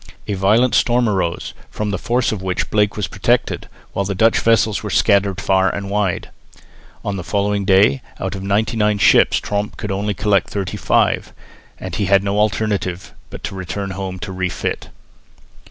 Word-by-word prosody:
A 105 - -1
violent 105 +6 +3
storm 120 0 +3
arose, 90 -5 -1 0.2
from 105 -1 -3
the 100 - -2
force 120 +1 0
of 105 -4 -4
which 95 -1 -2
Blake 105 -1 +1
was 105 - -1
protected, - - 0 0.2
while 100 - 0
the 100 0 -3
Dutch 115 +4 +3
vessels 110 -2 +2
were 105 - -5
scattered 100 -2 +2
far 95 0 +2
and 100 0 -5
wide. 100 -3 -1 0.7
On 100 -1 -2
the 90 - -5
following 100 +1 0
day, 100 +7 +4 0.2
out 95 +1 -3
of 95 - -6
ninety 100 +4 0
nine 105 -1 +2
ships 95 - +5
Tromp 105 0 -3
could 105 -2 -4
only 100 +1 -2
collect 100 +1 +1
thirty 100 -3 -3
five, - - +1 0.5
and - - -7
had 100 -1 +2
no 100 +1 0
alternative 100 -3 -1 0.2
but - - -10
to - - -4
return 95 +2 -4
home 95 0 -5
to 95 - -6
refit. 95 -1 -3
100 Hz, 175 wpm, -19 LUFS, 95-105 Hz, 0.7 s, ships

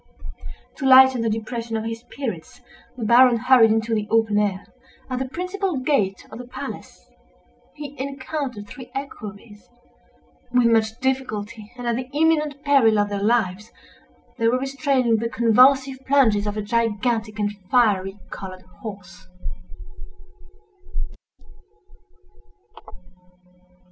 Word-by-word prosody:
To 270 - -4
lighten 260 -1 +7
the 230 - 0
depression 225 +1 -3
of 220 - -4
his 225 0 -4
spirits, 230 - -7 0.4
the 230 - -4
Baron 240 +1 +6
hurried 250 -1 +5
into 225 +1 0
the 210 -1 -1
open 220 -2 +2
air. 200 -2 -1 0.5
At 255 - -1
the 260 -1 -3
principal 365 +1 -3
gate 255 -8 0
of 220 - -9
the 250 - -9
palace - - -9 0.7
he 290 -2 -8
encountered 270 -4 -5
three 255 +1 -11
equerries. 210 -6 -8 0.8
With 245 -1 +3
much 225 -1 +2
difficulty, 220 -5 -3
and 245 - -7
at 235 -1 0
the 255 0 -5
imminent 300 -2 +1
peril 260 -7 +4
of 205 0 +1
their 200 -1 -3
lives, 210 -1 0 0.7
they 230 - +2
were 245 +2 +3
restraining 270 -3 +1
the 230 +1 -2
convulsive 260 +4 +3
plunges 225 -7 +3
of 210 +1 -3
a 210 - -2
gigantic 225 0 -1
and 205 -1 -1 0.2
fiery 200 -5 +2
colored 185 -1 -8 0.2
horse. 190 -4 -10
230 Hz, 125 wpm, -22 LUFS, 210-265 Hz, 0.8 s, lighten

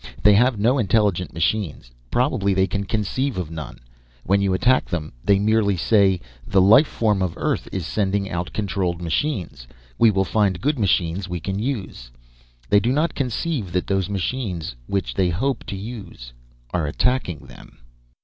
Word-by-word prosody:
They 105 - +7
have 120 +3 +3
no 120 +6 +2
intelligent 100 -5 +1
machines; 80 - -2 0.2
probably 100 - +1
they 95 0 +3
can 100 +1 -3
conceive 115 +6 -1
of 85 -4 -4
none. 75 -6 -7 0.5
When 100 +1 +2
you 100 -1 +1
attack 130 +6 +3
them, 80 -6 -4
they 100 -1 +4
merely 105 -1 +2
say 95 0 +3 0.3
'The 95 - +3
life 110 +11 +6
form 105 -4 0
of 90 -3 -1
Earth - - -1
is 95 -4 -3
sending 100 +1 -1
out 85 0 -4
controlled 95 -4 -2
machines. 85 - -2 0.3
We 115 - +7
will 95 -2 +1
find 95 -1 +1
good 145 0 0
machines 95 -1 0
we 90 0 -3
can 95 +4 -3
use.' 105 - -4 0.6
They 105 - +5
do 120 +4 0
not 155 +5 +1
conceive 125 - -2
that 90 - 0
those 95 -2 -1
machines 95 - -3
which 100 -1 -2
they 95 -2 +1
hope 125 +10 -1
to - - -5
use 95 - -8 0.4
are 85 -4 0
attacking 90 - -1
them. - - -15
100 Hz, 170 wpm, -22 LUFS, 90-110 Hz, 0.6 s, They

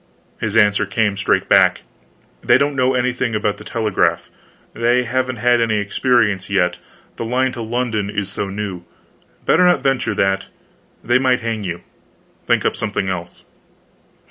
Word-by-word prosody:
His 110 0 -1
answer 105 -1 +3
came 105 -1 0
straight 95 -1 0
back: - - +4 0.6
"They 120 - +5
don't 140 +1 0
know 130 -1 +2
anything 125 -2 -1
about 105 -1 -1
the - - -10
telegraph; 105 -8 -1 0.4
they 120 +2 +2
haven't 130 +1 -1
had 120 +1 +2
any 110 -2 +1
experience 105 -1 +1
yet, 90 -3 +1 0.4
the - - -4
line 130 +3 0
to 120 -2 -7
London 115 -3 -2
is 105 -1 -3
so 100 0 -4
new. 95 -3 -5 0.6
Better 180 - +4
not 180 0 +3
venture 130 -5 0
that. 95 -1 0 0.6
They 120 +2 +3
might 130 -1 +2
hang 115 -2 -3
you. 85 -2 -5 0.7
Think - - +2
up - - +1
something 95 - -2
else." 90 -2 -6
110 Hz, 155 wpm, -19 LUFS, 100-125 Hz, 0.7 s, They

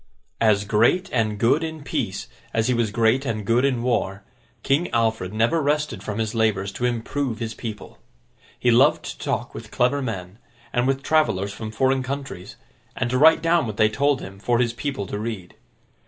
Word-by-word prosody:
As 105 -3 +3
great 115 - +2
and 110 -4 +1
good 120 +9 +3
in 160 -2 -5
peace, 125 -11 -3 0.3
as 110 0 +2
he - - +3
was 120 -2 +1
great 115 +4 +2
and 110 -6 -3
good 115 +4 +2
in 130 -4 +1
war, 100 -5 -1 0.4
King 145 +6 +1
Alfred 110 -5 0
never 115 +9 +1
rested 145 -7 0
from 105 0 -5
his 110 -1 -1
labours 105 -4 +1
to 125 - -3
improve 125 +1 -2
his 115 -1 -4
people. 110 -2 -8 0.6
He 125 - +3
loved 130 +6 +4
to - - -6
talk - - -3
with - - -9
clever 135 +4 +1
men, 95 -5 -5 0.3
and 120 +1 +1
with 135 0 0
travellers 110 -11 +1
from 110 0 -6
foreign 130 +4 +1
countries, 135 -8 -6 0.4
and 120 - -1
to 130 - +1
write 160 +2 +6
down 165 -5 +3
what 105 -1 -5
they 110 -1 +4
told 140 +4 +1
him, 95 +1 -9
for 120 +3 +1
his 120 -1 +1
people 135 -4 -3
to 105 - -5
read. 105 -5 -5
115 Hz, 190 wpm, -23 LUFS, 110-135 Hz, 0.6 s, write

